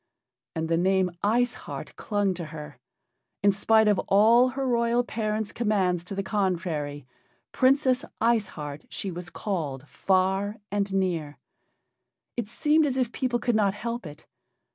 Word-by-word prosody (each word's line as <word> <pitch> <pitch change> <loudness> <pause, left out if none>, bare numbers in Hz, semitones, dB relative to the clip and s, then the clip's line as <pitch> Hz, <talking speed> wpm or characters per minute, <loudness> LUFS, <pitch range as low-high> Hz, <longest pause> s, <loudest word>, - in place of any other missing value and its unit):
And 160 0 -1
the 165 0 +1
name 190 0 +2
"Ice 240 +4 +2
Heart" - - -8
clung 205 -2 0
to 175 -2 -6
her. 150 -4 -9 0.6
In 200 - +6
spite 220 +2 +3
of 205 -2 +3
all 225 +5 +6
her 265 +1 -2
royal 235 0 +2
parents' 215 -2 -2
commands 195 -6 +1
to 195 - -6
the 195 - -2
contrary, 170 - -2 0.5
"Princess 260 -1 +3 0.2
Ice 225 -3 +2
Heart" 145 -1 -6
she 195 - -4
was 175 0 -6
called 150 - -4
far 190 +4 +1 0.2
and 200 -1 0
near. 170 -7 -1 1.0
It 235 -4 -3
seemed 300 +5 +3
as 265 -2 -2
if 250 -3 0
people 250 -2 0
could 240 0 0
not 200 -2 +2
help 235 -2 -4
it. 150 +1 -12
200 Hz, 150 wpm, -26 LUFS, 175-235 Hz, 1.0 s, In